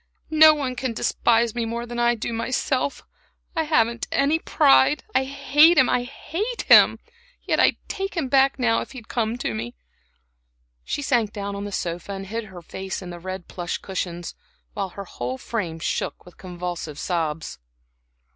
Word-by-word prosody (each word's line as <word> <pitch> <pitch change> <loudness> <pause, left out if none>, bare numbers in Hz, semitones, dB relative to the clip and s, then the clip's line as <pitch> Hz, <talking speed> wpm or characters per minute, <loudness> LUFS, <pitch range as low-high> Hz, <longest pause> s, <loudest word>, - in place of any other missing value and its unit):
No 310 0 +8
one 265 -4 -3
can 255 -1 -2
despise 230 0 +2
me 240 - -2
more 235 +1 -3
than 240 0 -5
I 240 0 +3
do 230 +1 -4
myself. 255 +4 -1 0.5
I 320 - +1
haven't 235 -6 +1
any 290 +4 +2
pride. 135 - +4
I 265 - +2
hate 295 +5 +4
him 260 - +6
I 245 - +2
hate 340 - -4
him; - - +7 0.5
yet - - 0
I'd - - +4
take 390 -1 -4
him 300 -5 0
back 270 +1 +3
now, 235 -3 +2
if - - -8
he'd 240 -4 -10
come 230 -1 -1
to 180 - -3
me." 115 +2 -5 1.1
She 290 - -3
sank 240 -6 +1
down 200 -1 -5
on 200 0 -5
the 205 - -6
sofa 175 +1 -4
and 195 0 -6
hid 225 +3 -4
her 185 -4 -11
face 190 +3 -6
in 180 - -7
the 175 - -8
red 185 0 -6
plush 175 -1 -4
cushions, 175 -2 -5 0.4
while 195 -2 -3
her 200 +2 -8
whole 125 -6 -5
frame 175 - -4
shook 165 - -3
with 180 - -15
convulsive 175 -4 -6
sobs. 160 - -3
225 Hz, 175 wpm, -24 LUFS, 180-265 Hz, 1.1 s, No